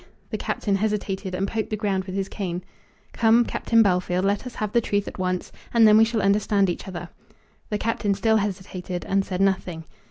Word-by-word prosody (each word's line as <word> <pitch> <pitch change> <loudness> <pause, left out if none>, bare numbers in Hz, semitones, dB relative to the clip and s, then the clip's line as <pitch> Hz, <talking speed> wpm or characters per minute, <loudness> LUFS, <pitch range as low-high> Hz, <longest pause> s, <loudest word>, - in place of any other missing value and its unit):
The - - -1
Captain 200 -2 -1
hesitated, 200 -2 -2
and 195 +2 -1
poked 220 +1 -2
the 215 - -1
ground 195 -3 -1
with 190 0 -6
his 195 -1 -1
cane. 180 -4 -4 0.5
"Come, 230 +1 +4
Captain 230 0 +3
Bellfield, 180 -2 +1
let 200 +5 0
us 250 - -9
have 215 -1 -3
the 235 - +3
truth 205 -2 -1
at - - -7
once, 185 -1 -2 0.2
and 230 -2 +6
then 210 - +7
we 220 +1 +7
shall 225 -3 -1
understand 200 -1 +3
each 175 - -7
other." 175 -2 -6 0.6
The 210 - 0
Captain 210 -2 0
still 220 +2 +3
hesitated, 190 -3 -4
and 195 0 +1
said 185 -1 -3
nothing. 185 -4 0
200 Hz, 200 wpm, -24 LUFS, 185-215 Hz, 0.6 s, then